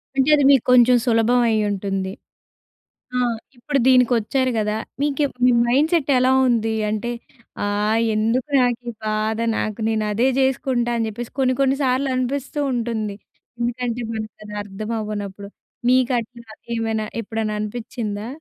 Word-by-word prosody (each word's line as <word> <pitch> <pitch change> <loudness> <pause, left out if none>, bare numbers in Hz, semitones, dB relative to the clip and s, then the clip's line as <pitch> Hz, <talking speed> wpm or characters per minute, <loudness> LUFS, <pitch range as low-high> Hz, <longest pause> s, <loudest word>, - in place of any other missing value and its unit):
అంటే, 270 +2 +2
అది 290 - +2
మీకు 270 -4 +4
కొంచెం 250 0 +6
సులభం 235 +1 +3
అయ్యుంటుంది. 200 -3 -1 1.0
ఆ! - - +2 0.4
ఇప్పుడు 275 +4 -1
దీనికొచ్చారు 250 0 +3
గదా! 210 0 0 0.3
మీకేం 290 -1 0 0.2
మీ - - +6 0.2
మైండ్‌సెట్ 295 +4 +2
ఎలా 255 +1 +3 0.2
ఉంది? 225 -2 +1 0.2
అంటే, 215 +3 -2 0.5
ఆహ్, 210 +2 +1 0.2
ఎందుకు 230 +5 0
నాకీ 245 -1 0 0.2
బాధ, 215 +1 -1 0.2
నాకు 215 +1 -3
నేను 220 -1 0
అదే 230 +5 +2
జేసుకుంటా 260 -2 +1
అని 225 - 0
చెప్పేసి 230 +2 -7
కొన్ని, 255 -1 +2
కొన్ని 270 0 +3
సార్లు 260 +2 +1
అనిపిస్తూ 275 +3 -2
ఉంటుంది. 225 -4 -2 0.4
ఎందుకంటే, 240 0 -2
మనకు 215 -2 -5
అది 210 0 -9
అర్థమవ్వనప్పుడు. 205 -1 -5 0.4
మీకట్లా 240 -2 0 0.3
ఏమైనా, 220 -1 -1 0.2
ఎప్పుడన్నా, 220 0 -3
అనిపిచ్చిందా? 215 -1 -4
235 Hz, 125 wpm, -21 LUFS, 215-255 Hz, 1.0 s, కొంచెం